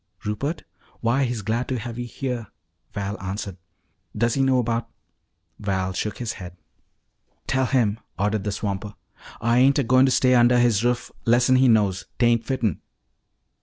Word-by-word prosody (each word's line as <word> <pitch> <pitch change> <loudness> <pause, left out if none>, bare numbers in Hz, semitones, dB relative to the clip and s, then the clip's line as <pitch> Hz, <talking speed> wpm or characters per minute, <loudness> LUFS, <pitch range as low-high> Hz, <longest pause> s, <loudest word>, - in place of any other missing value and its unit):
"Rupert? 135 +10 -3 0.4
Why, 130 +4 +2
he's 120 -4 -3
glad 115 +4 -1
to 130 - -2
have 120 0 -6
you 120 - -4
here," 120 -2 -4 0.4
Val 100 0 -4
answered. 95 0 -5 0.6
"Does 115 +1 +2
he 135 - +1
know 130 -2 +3
'bout 115 0 -2 0.4
" 85 0 -47
Val 95 -1 -1
shook 105 +2 -3
his 115 -2 -3
head. 90 0 -9 0.9
"Tell 130 -1 +1
him!" 115 -5 +1 0.2
ordered 105 +1 0
the 105 - -2
swamper. 100 0 -4 0.5
"Ah 115 0 +2
ain't 130 +4 +5
a 140 - +2
goin' 130 +2 +4
to - - +2
stay 130 0 +4
undah 120 0 +5
his 120 -3 +3
ruff 120 -1 0
lessen 120 +2 +4
he 130 0 +5
knows. 100 -5 +2
'Tain't 120 -1 +3
fitten." 115 - -1
115 Hz, 165 wpm, -24 LUFS, 105-125 Hz, 0.9 s, ain't